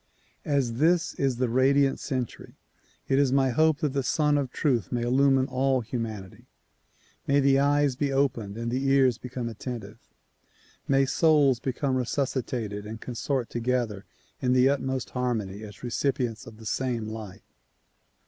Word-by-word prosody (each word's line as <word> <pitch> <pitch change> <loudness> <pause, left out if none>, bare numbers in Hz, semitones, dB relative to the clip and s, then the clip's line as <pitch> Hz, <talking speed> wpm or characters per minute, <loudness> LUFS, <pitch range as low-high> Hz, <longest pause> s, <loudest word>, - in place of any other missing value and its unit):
As 135 -6 0
this 170 +4 +3
is 135 -2 +1
the 125 +1 0
radiant 135 +3 +3
century, 130 -4 -5 0.5
it 135 0 +2
is 140 -2 +3
my 135 -1 +3
hope 155 +4 +2
that 150 -4 0
the 140 - +1
Sun 150 +2 +1
of 140 -3 -1
Truth 120 - 0
may 120 -1 -1
illumine 135 +2 +3
all 130 0 +1
humanity. 110 -5 -6 0.8
May 140 +1 +4
the 135 -1 +4
eyes 145 -1 +2
be 140 +1 -1
opened 120 -7 0
and 115 0 -3
the 130 +2 -1
ears 135 -3 +3
become 125 -1 -5
attentive; 115 -2 -7 0.9
may 135 0 +3
souls 145 -4 +3
become 130 +1 -1
resuscitated 120 -5 -2
and 110 +1 -7
con 125 - -7
sort 125 0 -2
together 120 -4 -1 0.4
in 125 -1 +2
the 130 +1 +5
utmost 130 -2 -2
harmony 110 -6 -2
as 105 0 -11
recipients 125 -2 -2
of 110 - -11
the 110 - -13
same 120 0 -1
light. 110 -3 -8
130 Hz, 155 wpm, -27 LUFS, 115-140 Hz, 0.9 s, the